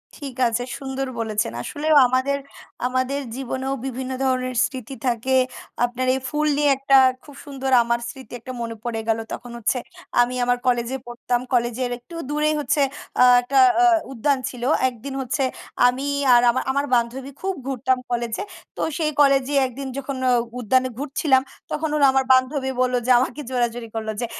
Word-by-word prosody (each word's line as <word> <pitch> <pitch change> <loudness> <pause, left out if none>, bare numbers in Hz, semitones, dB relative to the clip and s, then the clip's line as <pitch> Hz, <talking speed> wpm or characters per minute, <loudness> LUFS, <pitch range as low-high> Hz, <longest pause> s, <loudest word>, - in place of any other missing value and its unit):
ঠিক 275 -4 -8
আছে। 235 +1 -1
সুন্দর 270 0 -4
বলেছেন। 215 - -1
আসলেও 300 - 0
আমাদের 260 +3 +1 0.5
আমাদের 255 +2 -1 0.2
জীবনেও 265 +1 -3
বিভিন্ন 260 0 -4
ধরনের 255 -1 0
স্মৃতি 260 0 -7
থাকে। 245 +2 +1 0.5
আপনার 250 +1 -3
এই - - -2
ফুল 300 0 0
নিয়ে 295 0 +3
একটা 275 0 +4 0.3
খুব 290 - -14
সুন্দর 270 -2 -4
আমার 235 0 0
স্মৃতি 260 +1 -11
একটা 255 +3 -8
মনে 230 -1 -4
পড়ে 235 -2 -3
গেলো। 225 0 +1
তখন 245 -1 -7
হচ্ছে 235 +2 0 0.4
আমি 245 +1 0
আমার 245 0 +2
কলেজে 245 +1 +1
পড়তাম। 240 0 -2
কলেজের 245 +1 0
একটু 290 +8 -13
দূরে 300 +1 +1
হচ্ছে 290 0 +1 0.4
আ - - +9 0.2
একটা 265 +2 +1 0.2
আ - - +7 0.3
উদ্যান 270 +2 +1
ছিল। 245 -2 -9 0.3
একদিন 255 +3 -8
হচ্ছে 265 +2 -1 0.4
আমি 255 +3 -1 0.3
আর 240 - +7
আমার 260 - -1
আমার 280 +1 0
বান্ধবী 255 +4 -1
খুব 385 0 -1
ঘুরতাম 260 -1 +1
কলেজে। 235 - -2 0.3
তো - - -3 0.2
সেই 310 -2 0
কলেজে 275 -1 +3
একদিন 265 +2 -6
যখন 275 0 -4
অ - - +4 0.3
উদ্যানে 255 +3 +2
ঘুরছিলাম। 275 -1 +2 0.3
তখন 315 +1 -1
ওরা 285 - +4
আমার 265 0 +2
বান্ধবী 265 +1 +1
বললো 255 0 +2
যে 255 - +3
আমাকে 260 +3 -2
জোরাজুরি 240 -2 -1
করল 220 -1 -3
যে, - - 0
260 Hz, 165 wpm, -22 LUFS, 240-275 Hz, 0.5 s, আ